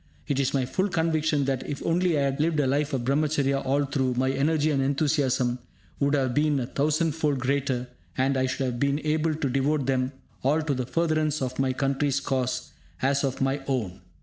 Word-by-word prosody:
It 140 - 0
is 135 - +1
my 130 -2 +1
full 185 +10 0
conviction 160 -4 +1
that, 135 -1 -1
if 140 - -5
only 170 -1 +2
I 140 - +2
had 135 0 -1
lived 155 0 +1
a 145 - +3
life 140 +2 +1
of 130 -3 -1
Brahmacharya 140 0 +1
all 140 +2 +1
through, 130 -2 0
my 130 +1 +1
energy 150 +3 +1
and 140 -2 +1
enthusiasm 135 -3 +1 0.4
would 140 +1 +2
have 130 -3 +1
been 150 0 +2
a 125 - -2
thousandfold 150 +1 0
greater 130 -1 -1 0.3
and 135 +1 +2
I 130 0 +1
should 130 +1 -2
have 120 -2 -3
been 140 +1 +2
able 155 +1 +1
to 150 -2 -1
devote 135 +2 +1
them 130 0 0 0.3
all 150 +4 +2
to 150 -2 0
the 125 -2 -3
furtherance 155 -2 +1
of 130 -1 -3
my 135 -1 +2
country's 135 +1 0
cause 130 -2 -2 0.3
as 140 +1 +2
of 135 -1 -2
my 135 +1 +1
own. 110 -10 -2
140 Hz, 200 wpm, -26 LUFS, 130-150 Hz, 0.4 s, a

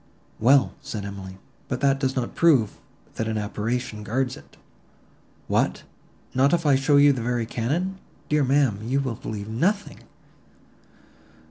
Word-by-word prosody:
"Well," 135 +4 +4
said 110 -8 -5
Emily, 95 -2 -8 0.3
"but 125 - -3
that 135 -1 +3
does 130 -1 -1
not 125 -3 -2
prove, 135 -11 +3 0.4
that 110 - -1
an 110 -1 -1
apparition 110 +2 -3
guards 125 +4 -1
it." - - -17 0.9
"What! - - 0 0.5
not 135 +4 +3
if 170 -1 +1
I 145 - +5
show 135 +2 +3
you 145 0 +6
the 125 - -4
very 120 0 -1
cannon! 165 +13 -2 0.3
Dear 150 -1 +2
ma'am, 135 -6 +2
you 125 +5 0
will 130 -4 -2
believe 105 -1 -6
nothing." 185 - -1
130 Hz, 145 wpm, -24 LUFS, 110-140 Hz, 0.9 s, you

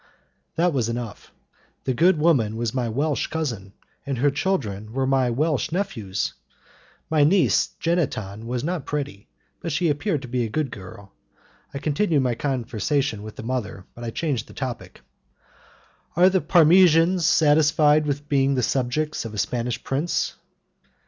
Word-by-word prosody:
That 175 0 +2
was 120 -4 0
enough. 115 -3 -6 0.5
The 130 - 0
good 170 +7 +4
woman 140 -9 +2
was 115 -1 -2
my 125 -3 -1
Welsh 145 +5 -1
cousin, 115 -12 -4 0.3
and 140 -2 -3
her 140 +4 +3
children 110 - -2
were 135 +1 0
my 130 -2 +2
Welsh 150 +5 0
nephews. 115 - -2 0.8
My 155 -2 +4
niece 155 - +3
Jeanneton 115 - -2
was 125 +1 -2
not 170 -2 -3
pretty; 140 -9 -4 0.3
but 170 - -4
she 160 +3 +1
appeared 150 0 -1
to - - -7
be 125 0 -1
a 115 - -3
good 140 +3 -2
girl. 95 0 -11 0.6
I - - -6
continued 150 +1 +1
my 125 -2 +1
conversation 130 -1 -1
with 110 0 -9
the - - -8
mother, 110 -6 -4
but 120 - -10
I 115 - -3
changed 130 -2 -2
the - - -13
topic. 130 -3 -6 1.1
"Are 180 +3 +6
the 190 -1 +2
Parmesans 170 0 +5
satisfied 150 0 +4
with 145 0 -3
being 140 -1 +2
the 125 - 0
subjects 140 +6 -1
of 110 -2 -7
a - - -7
Spanish 120 +3 -2
prince?" 145 +6 -1
140 Hz, 155 wpm, -23 LUFS, 115-155 Hz, 1.1 s, Are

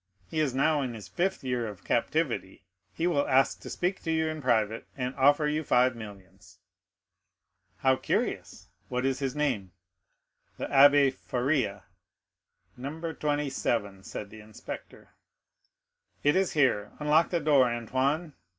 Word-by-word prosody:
He 160 - -1
is 140 -5 0
now 150 +2 +2
in 125 -3 -3
his 105 -4 -9
fifth 185 - -1
year 125 -3 -1
of 105 -4 -9
captivity; 125 -6 -1 0.3
he 130 +12 -2
will 155 -5 +1
ask 135 +1 +3
to - - -8
speak 180 +2 -2
to 165 - -2
you 160 0 +1
in 155 -1 -5
private, 115 -4 +1
and 125 0 -2
offer 145 +3 +4
you 155 +1 -1
five 125 -2 +3
millions." 100 -4 -12 1.2
"How 130 -1 +3
curious!—what 125 0 -3
is 135 0 0
his 135 -1 -2
name?" 125 -11 -1 0.8
"The - - -3
Abbé 140 0 +6
Faria." 125 -7 -1 0.9
"No. 160 +6 -5
27," 130 -10 -1
said 100 +1 -7
the 110 - -11
inspector. 105 0 -10 1.1
"It 145 - +4
is 190 -1 +1
here; 125 -9 +1
unlock 150 +2 +3
the 170 - 0
door, 145 -5 +4
Antoine." 135 +7 -1
135 Hz, 140 wpm, -28 LUFS, 115-150 Hz, 1.2 s, Abbé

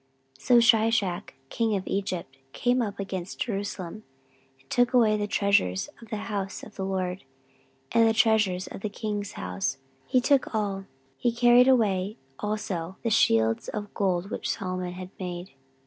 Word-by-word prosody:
14:012:009 - - -19
So 245 - +7
Shishak 220 -5 +3 0.2
king 225 -2 0
of 190 - -3
Egypt 185 -8 -3 0.2
came 245 +1 +2
up 205 -3 -3
against 190 -2 -5
Jerusalem, 200 -3 -4 0.6
and 135 - -28
took 245 - +2
away 220 -3 +5
the 205 -1 -1
treasures 200 - +2
of 230 - -13
the 220 - -3
house 195 -3 -4
of 210 - -10
the 190 - -4
LORD, 185 -1 -2 0.7
and 230 -1 +5
the - - +2
treasures 215 -5 +3
of - - -9
the 215 - -2
king's 205 -1 -4
house; 90 +9 -3 0.3
he 255 - +3
took 265 -2 +2
all: 200 -2 -1 0.3
he 240 - +2
carried 240 +1 +6
away 210 -5 +2 0.2
also 190 -4 -3
the 230 - 0
shields 115 - +3
of 205 -1 -5
gold 190 -1 0
which - - -3
Solomon 185 -2 -3
had 185 0 -8
made. 180 -1 -5
200 Hz, 165 wpm, -27 LUFS, 185-225 Hz, 0.7 s, So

